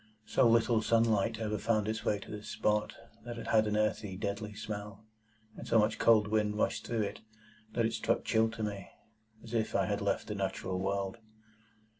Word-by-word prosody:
So -, -, +3 dB
little 115 Hz, 0 st, +4 dB
sunlight 115 Hz, -1 st, +2 dB
ever 105 Hz, -2 st, -2 dB
found 110 Hz, -1 st, +1 dB
its 110 Hz, 0 st, -2 dB
way 105 Hz, -, +1 dB
to -, -, -10 dB
this 105 Hz, 0 st, -7 dB
spot, 105 Hz, 0 st, 0 dB, 0.3 s
that 120 Hz, -1 st, -6 dB
it -, -, -6 dB
had 110 Hz, -1 st, +3 dB
an 105 Hz, 0 st, 0 dB
earthy, 105 Hz, -3 st, -1 dB
deadly 105 Hz, +1 st, -4 dB
smell; 105 Hz, -1 st, -6 dB, 0.5 s
and -, -, -9 dB
so -, -, +4 dB
much 105 Hz, 0 st, +2 dB
cold 110 Hz, -2 st, +5 dB
wind 105 Hz, -1 st, +1 dB
rushed -, -, 0 dB
through 115 Hz, -2 st, 0 dB
it, 100 Hz, -, -5 dB, 0.5 s
that 115 Hz, 0 st, +1 dB
it 115 Hz, -, 0 dB
struck -, -, 0 dB
chill 110 Hz, 0 st, +3 dB
to 110 Hz, 0 st, -5 dB
me, 100 Hz, -3 st, -4 dB, 0.5 s
as 115 Hz, -, -10 dB
if 110 Hz, -2 st, 0 dB
I 95 Hz, -, +3 dB
had 105 Hz, +1 st, -1 dB
left 100 Hz, -, 0 dB
the 105 Hz, -, -4 dB
natural 95 Hz, -2 st, -2 dB
world. 95 Hz, +2 st, -2 dB
105 Hz, 195 wpm, -32 LUFS, 105-115 Hz, 0.5 s, cold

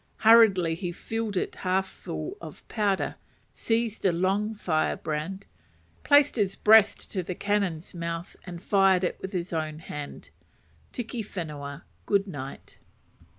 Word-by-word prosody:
Hurriedly 205 Hz, -7 st, +6 dB
he 175 Hz, +1 st, -4 dB
filled 220 Hz, +2 st, -4 dB
it -, -, -1 dB
half 190 Hz, +1 st, 0 dB
full 190 Hz, -, -6 dB
of -, -, -11 dB
powder, 205 Hz, -3 st, 0 dB, 0.4 s
seized 225 Hz, -1 st, -1 dB
a 190 Hz, -, +4 dB
long 195 Hz, +5 st, 0 dB
firebrand, 160 Hz, +1 st, -2 dB, 0.6 s
placed 285 Hz, -2 st, +5 dB
his 195 Hz, -3 st, +1 dB
breast 220 Hz, -1 st, +5 dB
to 190 Hz, -, -1 dB
the 180 Hz, +1 st, -5 dB
cannon's 200 Hz, -5 st, -1 dB
mouth, 170 Hz, 0 st, -5 dB
and 175 Hz, 0 st, -8 dB
fired 195 Hz, -2 st, +4 dB
it 180 Hz, -, -1 dB
with 190 Hz, -, -5 dB
his 180 Hz, -2 st, -3 dB
own 155 Hz, -1 st, -2 dB
hand. 150 Hz, -2 st, -8 dB, 0.6 s
Tiki 240 Hz, -1 st, -4 dB
Whenua, 150 Hz, -8 st, -6 dB, 0.2 s
good 200 Hz, -1 st, +3 dB
night! 140 Hz, -8 st, -8 dB
190 Hz, 135 wpm, -27 LUFS, 170-210 Hz, 0.6 s, Hurriedly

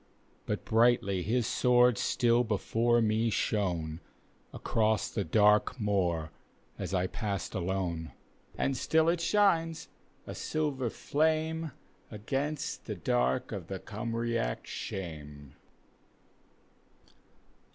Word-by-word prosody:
But -, -, -3 dB
brightly 110 Hz, -5 st, +3 dB
his 115 Hz, +5 st, 0 dB
sword 125 Hz, 0 st, +4 dB
still 120 Hz, 0 st, +2 dB
before 115 Hz, +2 st, +1 dB
me 110 Hz, +1 st, +2 dB
shon^ 85 Hz, -8 st, -1 dB, 0.5 s
Across 110 Hz, -1 st, 0 dB
the 100 Hz, -, -1 dB
dark 105 Hz, +4 st, +3 dB
moor 90 Hz, -7 st, 0 dB, 0.5 s
as -, -, -4 dB
I 90 Hz, -1 st, +1 dB
passed 100 Hz, -2 st, -3 dB
alone. 85 Hz, -4 st, -2 dB, 0.5 s
And 135 Hz, -, 0 dB
still 160 Hz, +5 st, +2 dB
it 170 Hz, 0 st, +1 dB
shines, 170 Hz, -4 st, +2 dB, 0.4 s
a -, -, -6 dB
silver 145 Hz, -6 st, -2 dB
flame, 160 Hz, +4 st, 0 dB, 0.4 s
Across 140 Hz, +8 st, -3 dB
the 105 Hz, -, -7 dB
dark 125 Hz, +5 st, 0 dB
night 105 Hz, -, -2 dB
of 85 Hz, -, -15 dB
the 95 Hz, -, -4 dB
Cymraec 115 Hz, -, -2 dB
shame. 75 Hz, -6 st, -7 dB
110 Hz, 105 wpm, -30 LUFS, 95-130 Hz, 0.5 s, sword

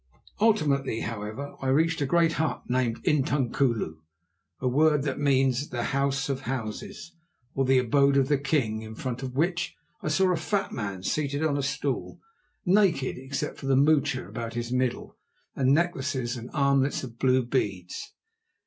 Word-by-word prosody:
Ultimately, 145 Hz, -, +2 dB
however, 115 Hz, +5 st, -5 dB
I 135 Hz, -, -2 dB
reached 160 Hz, +4 st, +2 dB
a 140 Hz, -, +1 dB
great 165 Hz, +2 st, +3 dB
hut 160 Hz, -, -1 dB
named 125 Hz, -2 st, 0 dB
intunkulu, 135 Hz, -, +1 dB, 0.6 s
a 130 Hz, -, -1 dB
word 150 Hz, +2 st, +3 dB
that 140 Hz, -2 st, -2 dB
means 135 Hz, -1 st, +2 dB
the 120 Hz, -1 st, -3 dB
"house 140 Hz, 0 st, +1 dB
of 135 Hz, -2 st, -2 dB
houses," 135 Hz, -, -5 dB, 0.4 s
or 135 Hz, -, +1 dB
the 130 Hz, 0 st, +4 dB
abode 140 Hz, +3 st, +3 dB
of 135 Hz, -1 st, +3 dB
the 145 Hz, -1 st, +2 dB
king, 135 Hz, -7 st, 0 dB
in 110 Hz, 0 st, -8 dB
front 125 Hz, +1 st, -4 dB
of 130 Hz, -1 st, -5 dB
which 175 Hz, +5 st, 0 dB, 0.3 s
I -, -, -4 dB
saw 185 Hz, +4 st, +3 dB
a -, -, 0 dB
fat 195 Hz, +5 st, -1 dB
man 100 Hz, -5 st, -4 dB
seated 145 Hz, +5 st, -1 dB
on 155 Hz, -3 st, +1 dB
a 140 Hz, -, 0 dB
stool, 140 Hz, -, -2 dB, 0.5 s
naked 180 Hz, -8 st, +3 dB
except 135 Hz, +1 st, -4 dB
for 135 Hz, -, -6 dB
the 135 Hz, -, +4 dB
moocha 140 Hz, -2 st, +2 dB
about 115 Hz, -1 st, -6 dB
his 120 Hz, 0 st, -3 dB
middle 125 Hz, -1 st, -1 dB, 0.4 s
and 130 Hz, -1 st, +2 dB
necklaces 135 Hz, -6 st, 0 dB
and 120 Hz, 0 st, -7 dB
armlets 140 Hz, -1 st, +2 dB
of 120 Hz, -3 st, -9 dB
blue 130 Hz, -1 st, +3 dB
beads. 95 Hz, -8 st, -2 dB
135 Hz, 165 wpm, -27 LUFS, 125-150 Hz, 0.6 s, the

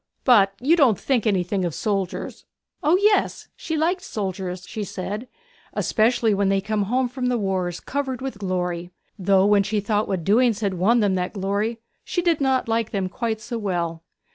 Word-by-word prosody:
But 200 Hz, -6 st, +5 dB
you 290 Hz, +7 st, +4 dB
don't 265 Hz, -, +4 dB
think 245 Hz, -5 st, 0 dB
anything 190 Hz, -1 st, 0 dB
of 170 Hz, -4 st, -2 dB
soldiers.' 195 Hz, -4 st, -3 dB, 0.4 s
O 315 Hz, +5 st, +4 dB
yes, 410 Hz, 0 st, +1 dB
she 320 Hz, -, -3 dB
liked 350 Hz, +4 st, +1 dB
soldiers, 185 Hz, -3 st, -4 dB
she 215 Hz, -, -4 dB
said, 205 Hz, +5 st, -5 dB, 0.5 s
especially 225 Hz, -1 st, +2 dB
when 200 Hz, -1 st, +1 dB
they 195 Hz, 0 st, +2 dB
came 210 Hz, +2 st, -1 dB
home 250 Hz, +5 st, +1 dB
from 250 Hz, 0 st, -3 dB
the 250 Hz, -1 st, +1 dB
wars, 185 Hz, -4 st, -1 dB
covered 270 Hz, -3 st, -3 dB
with 260 Hz, -5 st, -5 dB
glory; 180 Hz, -3 st, -2 dB, 0.3 s
though 190 Hz, 0 st, +4 dB
when 205 Hz, 0 st, +5 dB
she 210 Hz, +2 st, -1 dB
thought 210 Hz, +1 st, 0 dB
what 185 Hz, -4 st, -2 dB
doings 225 Hz, +3 st, +3 dB
had 200 Hz, -3 st, 0 dB
won 210 Hz, +7 st, +3 dB
them 205 Hz, -2 st, +2 dB
that 180 Hz, -1 st, -2 dB
glory 205 Hz, +3 st, -2 dB, 0.2 s
she 350 Hz, -, -2 dB
did 335 Hz, -4 st, +2 dB
not 265 Hz, -2 st, +1 dB
like 225 Hz, -1 st, 0 dB
them 195 Hz, -3 st, -2 dB
quite 220 Hz, +2 st, -3 dB
so 235 Hz, +1 st, -4 dB
well. 170 Hz, -5 st, -2 dB
210 Hz, 185 wpm, -23 LUFS, 190-245 Hz, 0.5 s, But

